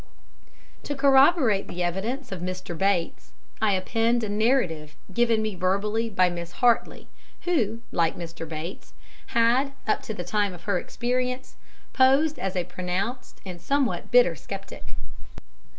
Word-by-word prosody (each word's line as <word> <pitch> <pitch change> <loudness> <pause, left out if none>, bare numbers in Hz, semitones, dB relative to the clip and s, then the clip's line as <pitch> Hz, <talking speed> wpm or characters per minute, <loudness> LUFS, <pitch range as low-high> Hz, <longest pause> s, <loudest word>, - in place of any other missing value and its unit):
To 290 - -4
corroborate 270 - +4
the 180 0 -3
evidence 215 +10 -3
of 185 -3 -5
"Mr. 185 -1 -5
Bates," 185 -1 -1 0.3
I 215 -2 +3
append 225 +5 +1
a 215 - -2
narrative 205 - 0 0.2
given 230 0 +2
me 215 -1 -2
verbally 200 +5 0
by 185 -3 +3
Miss 175 0 -5
Hartly, 240 -2 +1 0.3
who, 235 - 0
like 165 -1 +1
Mr. 165 -1 -7
Bates, 165 +3 -7 0.3
had, 240 +4 +2
up - - +1
to 220 - -6
the 175 - -4
time 200 +1 0
of 175 - -14
her 200 -4 0
experience, 250 +4 -3 0.4
posed 275 +4 +4
as 190 0 -3
a 180 - +1
pronounced 185 +8 -4
and 180 -2 -8
somewhat 275 0 0
bitter 245 -8 +5
sceptic. 130 - -9
210 Hz, 140 wpm, -25 LUFS, 180-245 Hz, 0.4 s, bitter